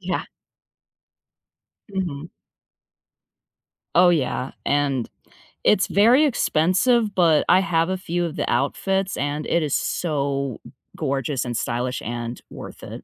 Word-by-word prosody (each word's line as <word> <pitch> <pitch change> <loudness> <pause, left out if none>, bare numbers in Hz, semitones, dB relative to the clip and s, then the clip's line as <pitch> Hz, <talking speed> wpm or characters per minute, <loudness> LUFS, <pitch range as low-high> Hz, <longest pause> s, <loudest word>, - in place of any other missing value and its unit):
Yeah. - - -2 1.6
Mhm. 170 -6 -4 1.7
Oh, 180 +1 +6
yeah, 135 -5 0 0.2
and 140 -4 +1 0.6
it's 205 -2 +3
very 240 +9 +5
expensive, 215 - +2
but 165 -4 +4
I 185 - +7
have 165 -1 +1
a 190 - -1
few 175 -1 -2
of 165 -1 -5
the - - -2
outfits, 190 +9 0
and 145 +2 -2
it 170 -1 +1
is 150 - -2
so 140 -5 -1 0.4
gorgeous 135 -3 -1
and 120 -2 -3
stylish 125 +2 -2
and 120 +1 -5
worth - - -10
it. - - -8
155 Hz, 120 wpm, -23 LUFS, 135-185 Hz, 1.7 s, I